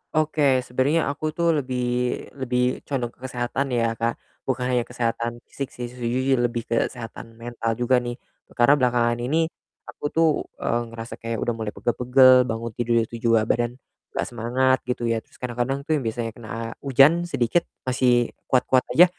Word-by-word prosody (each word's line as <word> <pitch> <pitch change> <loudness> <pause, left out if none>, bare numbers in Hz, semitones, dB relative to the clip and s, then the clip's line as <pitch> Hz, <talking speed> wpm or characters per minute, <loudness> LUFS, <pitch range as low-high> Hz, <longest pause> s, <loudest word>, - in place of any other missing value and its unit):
Oke 145 -4 +3
sebenarnya 140 +5 +1
aku 155 +1 -4
tuh 170 0 +1
lebih 125 -2 -2 0.6
lebih 125 0 0
condong 125 -4 -2
ke - - -34
kesehatan 125 +3 -2
ya, 115 -1 +2
Kak, 115 0 0 0.3
bukan 125 -1 0
hanya 120 -1 +2
kesehatan 115 0 -2
fisik 140 -2 -5
sih 120 0 -5
sejujurnya 125 +2 0
lebih 120 -1 0
ke 115 - +1
kesehatan 115 -1 -9
mental 115 -1 -3
juga 125 +1 +3
nih. 120 0 -4 0.4
Karena 140 +4 +5
belakangan 120 -1 +2
ini 160 +7 +1 0.3
aku - - -13
tuh, 165 +2 +3 0.4
eee, 120 0 +1
ngerasa 115 0 -8
kayak 115 0 -3
udah 120 - 0
mulai 105 -1 -4
pegel-pegel, 125 +1 +5
bangun 115 0 -3
tidur 120 +1 0
itu 115 - -8
juga 115 -2 +3
badan 120 +2 0 0.4
nggak - - 0
semangat 130 +3 +2
gitu 125 -1 -2
ya, 115 - +1
terus - - -23
kadang-kadang 125 +3 -2
tuh - - -3
yang - - -6
biasanya 115 0 -2
kena 110 -2 -9 0.3
hujan 145 +6 +5
sedikit 145 +4 +1 0.2
masih 125 -2 +2 0.2
kuat-kuat 130 0 +3
aja, 175 +3 +10
125 Hz, 170 wpm, -24 LUFS, 120-130 Hz, 0.6 s, aja